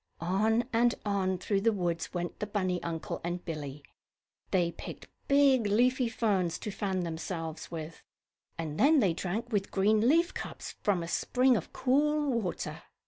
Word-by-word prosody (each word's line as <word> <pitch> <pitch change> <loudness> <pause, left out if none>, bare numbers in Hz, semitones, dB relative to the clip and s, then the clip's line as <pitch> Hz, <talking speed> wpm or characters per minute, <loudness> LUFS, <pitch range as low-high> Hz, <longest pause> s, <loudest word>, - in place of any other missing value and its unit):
On 220 +7 +2
and 235 +1 +3
on 190 -2 0
through 195 +2 0
the 230 +2 +4
woods 175 -5 -2
went 175 -1 -4
the 210 - -2
bunny 185 -3 -1
uncle 165 -1 -4
and 175 +1 -3
Billie. 145 -3 -5 0.7
They 175 -3 +2
picked - - -9 0.2
big, 275 -5 +4
leafy 245 +4 +3
ferns 190 -7 0
to 210 - -4
fan 190 -2 -1
themselves 165 -1 -4
with, 160 -1 -7 0.6
and 155 -2 -4
then 300 +2 +6
they 195 -8 +3
drank 205 +8 -3
with 200 -3 0
green 215 +4 +3
leaf 335 +4 +3
cups - - -6
from 190 -5 +1
a - - -5
spring 250 +8 +2
of 190 - -3
cool 295 +2 +2
water. 180 -4 -4
195 Hz, 160 wpm, -30 LUFS, 175-235 Hz, 0.7 s, then